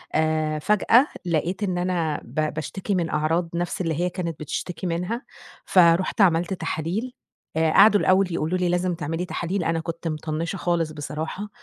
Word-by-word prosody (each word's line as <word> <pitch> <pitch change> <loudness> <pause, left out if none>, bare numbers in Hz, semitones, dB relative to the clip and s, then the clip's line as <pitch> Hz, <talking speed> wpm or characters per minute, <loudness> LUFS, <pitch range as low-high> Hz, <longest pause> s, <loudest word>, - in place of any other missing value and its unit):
آآ، 155 -1 +1
فجأة 210 - +4 0.2
لقيت 175 +4 -1
إن 185 -3 -1
أنا 175 -4 -1
ب 155 0 -2
باشتكي 190 +6 -3
من 170 -3 0
أعراض 165 +3 0
نَفْس 175 +1 -2
اللي 165 -2 -1
هي 180 - +1
كانت 170 -3 -4
بتشتكي 170 +4 -4
منها، 180 +8 -2 0.4
فرُحت 180 +3 +4
عملت 175 0 +3
تحاليل، 190 +8 -3 0.4
آآ 160 -1 +2
قعدوا 205 +2 +7
الأول 185 0 +4
يقولوا 160 +4 0
لي: 180 -1 0
"لازم 180 +1 +1
تعملي 165 +2 -3
تحاليل." 175 +1 -2
أنا 165 0 0
كنت 165 +1 -5
مطنِّشة 160 +3 -3
خالص 170 -3 0
بصراحة. 155 +7 -5
170 Hz, 160 wpm, -24 LUFS, 160-185 Hz, 0.4 s, قعدوا